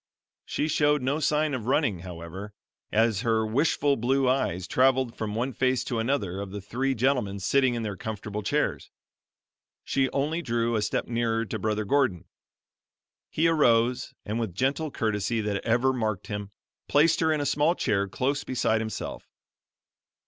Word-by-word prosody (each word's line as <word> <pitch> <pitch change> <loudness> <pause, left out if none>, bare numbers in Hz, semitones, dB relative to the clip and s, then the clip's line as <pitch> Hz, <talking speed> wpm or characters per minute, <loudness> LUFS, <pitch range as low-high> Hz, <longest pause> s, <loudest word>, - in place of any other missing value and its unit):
She 150 - -1
showed 150 -2 +2
no 140 +4 0
sign 150 0 +1
of 120 -4 -4
running 130 - +1
however, 90 +4 -8 0.4
as 110 -2 +2
her 110 -2 +1
wistful 140 +4 +2
blue 130 +3 +1
eyes 95 -9 0
traveled 130 +2 +2
from 105 -1 -4
one 125 +4 -1
face 130 -1 +1
to 120 -2 -2
another 115 -7 -1
of 100 - -5
the 100 +2 -6
three 130 +7 -1
gentlemen 120 -5 0
sitting 130 +5 +2
in 115 - -3
their 105 -2 -3
comfortable 105 +1 -5
chairs; - - -1 0.9
she 135 -1 +1
only 150 +5 -1
drew 120 -4 0
a 110 - +1
step 105 - -1
nearer 115 -1 0
to 110 0 -4
Brother 105 +1 -1
Gordon. 130 - +1 1.0
He 165 +2 +2
arose, 125 -6 +2
and 110 +3 -2
with 110 -7 -3
gentle 140 - 0
courtesy 110 -2 -1
that 105 -2 -2
ever 125 +3 +2
marked 110 -6 -2
him, 105 -1 -5 0.4
placed 150 +3 +4
her 160 -1 +2
in 155 - +1
a 145 - -1
small 150 +4 +2
chair 100 - 0
close 135 +7 -1
beside 110 -3 0
himself. 110 0 -5
115 Hz, 165 wpm, -27 LUFS, 105-135 Hz, 1.0 s, placed